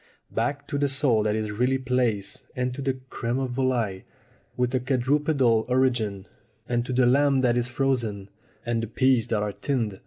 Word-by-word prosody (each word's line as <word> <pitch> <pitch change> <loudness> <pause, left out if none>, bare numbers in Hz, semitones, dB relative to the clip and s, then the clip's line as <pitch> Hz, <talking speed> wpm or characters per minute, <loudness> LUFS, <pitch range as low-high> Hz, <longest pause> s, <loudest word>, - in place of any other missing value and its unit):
Back 140 +5 -2
to 145 -2 -1
the 140 -1 +2
sole 135 -5 +2
that 105 0 0
is 110 -1 -2
really 125 +5 +1
plaice, 125 -6 -1
and 125 0 -1
to 140 - -6
the 135 -1 0 0.2
crime 120 +1 -2
de 135 - 0
volatile 120 -6 -1 0.6
with 125 0 0
a 130 - +2
quadrupedal 130 -2 +2
origin, 120 -7 +1 0.4
and 120 -1 0
to - - -3
the 125 0 +3
lamb 135 +1 +4
that 120 -2 +2
is 120 0 0
frozen, 120 -7 -1 0.4
and 120 -1 0
the 115 - -3
peas 125 0 +2
that 110 -3 0
are 105 - -2
tinned. 115 -8 -2
125 Hz, 185 wpm, -25 LUFS, 115-130 Hz, 0.6 s, lamb